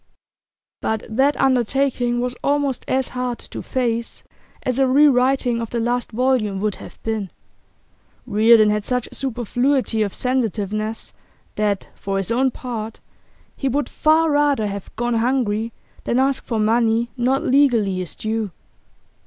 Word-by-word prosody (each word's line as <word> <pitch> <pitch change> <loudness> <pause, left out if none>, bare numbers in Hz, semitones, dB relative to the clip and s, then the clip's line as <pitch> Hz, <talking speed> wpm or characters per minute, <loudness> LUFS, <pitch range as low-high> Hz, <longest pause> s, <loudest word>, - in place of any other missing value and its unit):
But 220 -1 -1
that 270 +6 +2
undertaking 250 -1 +1
was 250 0 -2
almost 280 -2 0
as 260 0 0
hard 250 -1 -3
to - - -8
face 235 -2 -2 0.4
as 255 0 -1
a 270 - +4
rewriting 260 -3 +3
of 230 - -4
the 235 - -2
last 240 +1 -1
volume 235 -4 +1
would 210 0 -1
have - - -12
been. 220 -4 -2 1.0
Reardon 220 -1 +5
had 210 0 0
such 250 +2 -1
superfluity 245 -1 0
of 205 -2 -1
sensitiveness 220 -3 -2 0.4
that, 205 -2 -1
for 195 0 -3
his 195 +2 -2
own 260 +3 +3
part, 230 -3 -6 0.6
he 275 - -1
would 285 +3 0
far 315 +1 +3
rather 290 -6 +2
have 200 -1 -5
gone 240 +1 -1
hungry 230 -2 0 0.3
than 240 - +1
ask 270 +1 +1
for 230 - -2
money 230 +1 +2
not 260 +2 +1
legally 240 -8 +3
his 180 -2 -4
due. 220 -1 -2
240 Hz, 140 wpm, -21 LUFS, 220-265 Hz, 1.0 s, Reardon